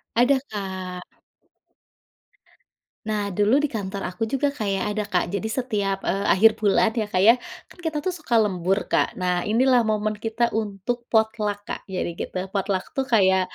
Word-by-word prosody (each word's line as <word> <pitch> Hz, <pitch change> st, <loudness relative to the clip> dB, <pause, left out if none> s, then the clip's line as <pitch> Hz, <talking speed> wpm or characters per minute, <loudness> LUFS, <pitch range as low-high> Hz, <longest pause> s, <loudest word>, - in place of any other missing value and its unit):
Ada, 250 Hz, +3 st, +4 dB
Kak. 185 Hz, -3 st, -5 dB, 2.0 s
Nah 210 Hz, -2 st, -1 dB
dulu 210 Hz, +8 st, +3 dB
di 295 Hz, -, +1 dB
kantor 200 Hz, -4 st, -4 dB
aku 185 Hz, +5 st, -4 dB
juga 270 Hz, +5 st, 0 dB
kaya 210 Hz, -8 st, -2 dB
ada 210 Hz, 0 st, -1 dB
Kak, 185 Hz, -4 st, 0 dB
jadi 200 Hz, +2 st, -1 dB
setiap, 205 Hz, -6 st, -1 dB
eee, 200 Hz, +1 st, 0 dB
akhir 220 Hz, +4 st, +6 dB
bulan 210 Hz, +1 st, +3 dB
ya 220 Hz, -, +1 dB
Kak, 185 Hz, -3 st, +2 dB, 0.5 s
kan -, -, -18 dB
kita 315 Hz, -1 st, -1 dB
tuh 370 Hz, -, 0 dB
suka 305 Hz, -8 st, -2 dB
lembur, 190 Hz, -1 st, 0 dB
Kak. -, -, +2 dB
Nah, 180 Hz, -1 st, 0 dB
inilah 245 Hz, +3 st, +4 dB
momen 215 Hz, 0 st, 0 dB
kita 225 Hz, +2 st, -2 dB, 0.2 s
untuk 205 Hz, +3 st, -3 dB
potluck 215 Hz, -2 st, +1 dB
Kak, -, -, -4 dB
jadi 185 Hz, -2 st, -3 dB
gitu. -, -, -4 dB, 0.2 s
Potluck 195 Hz, -1 st, 0 dB
itu 270 Hz, -, +1 dB
kayak, 190 Hz, -3 st, +5 dB
210 Hz, 160 wpm, -24 LUFS, 195-225 Hz, 2.0 s, akhir